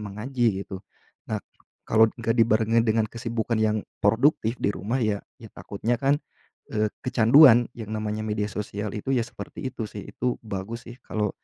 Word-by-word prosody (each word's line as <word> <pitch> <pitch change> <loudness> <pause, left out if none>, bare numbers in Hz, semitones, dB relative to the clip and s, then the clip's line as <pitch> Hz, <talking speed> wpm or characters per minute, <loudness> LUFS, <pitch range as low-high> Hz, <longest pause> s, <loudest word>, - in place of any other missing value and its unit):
mengaji 105 0 -1
gitu. 95 -1 -7 0.5
Nah - - 0 0.5
kalau 110 +1 +5
nggak 115 0 0
dibarengin 115 0 +3
dengan 110 -1 +2
kesibukan 115 0 -2
yang 110 -1 +1 0.2
produktif 115 +2 +3
di 100 - +1
rumah 115 +7 -2
ya, 105 -2 0 0.2
ya 110 - -10
takutnya 110 +4 -2
kan, 140 +2 +3 0.5
eee, 105 0 +1 0.2
kecanduan 120 0 +7
yang 110 -2 -6
namanya 110 0 -3
media 105 -1 -1
sosial 105 +1 -4
itu 130 +6 -2
ya 120 - +2
seperti 130 +2 -7
itu 120 - -4
sih, 105 - -9
itu 125 0 -1
bagus 110 +3 -6
sih 120 - -10
kalau, 105 -2 -1
110 Hz, 165 wpm, -25 LUFS, 105-120 Hz, 0.5 s, kecanduan